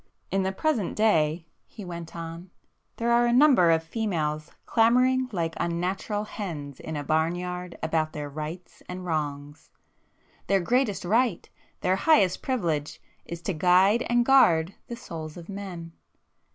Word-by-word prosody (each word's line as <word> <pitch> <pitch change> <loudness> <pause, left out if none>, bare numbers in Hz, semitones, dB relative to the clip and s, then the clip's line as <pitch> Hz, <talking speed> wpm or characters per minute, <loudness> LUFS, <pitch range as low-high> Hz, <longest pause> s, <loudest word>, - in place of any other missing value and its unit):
"In 195 - +1
the 190 0 0
present 225 - -1
day," 165 -6 +2 0.2
he 210 - -10
went 170 -2 -8
on—"there 170 +7 -7
are 240 0 +4
a - - +2
number 250 - +5
of 165 0 +3
females 160 -6 -2 0.2
clamouring 255 +3 +3
like 165 -4 -2
unnatural 185 +5 -2
hens 155 -10 -6
in 160 - -6
a 145 - -3
barn 160 +3 +1
yard 180 0 -6
about 155 -1 0
their 150 -1 -5
'rights' 155 +5 -7
and 180 0 -6
'wrongs.' 145 -1 -4 0.8
Their 195 0 +3
greatest 225 +1 0
right, 225 0 +1 0.3
their 185 +1 +2
highest 195 - +3
privilege, 165 - -2 0.3
is 170 0 -8
to 195 - -1
guide 185 +7 +4
and 240 0 +3
guard 180 -10 +5
the 235 - -5
souls 160 -8 -8
of 170 -1 -10
men. 185 -4 -7
180 Hz, 145 wpm, -26 LUFS, 160-215 Hz, 0.8 s, number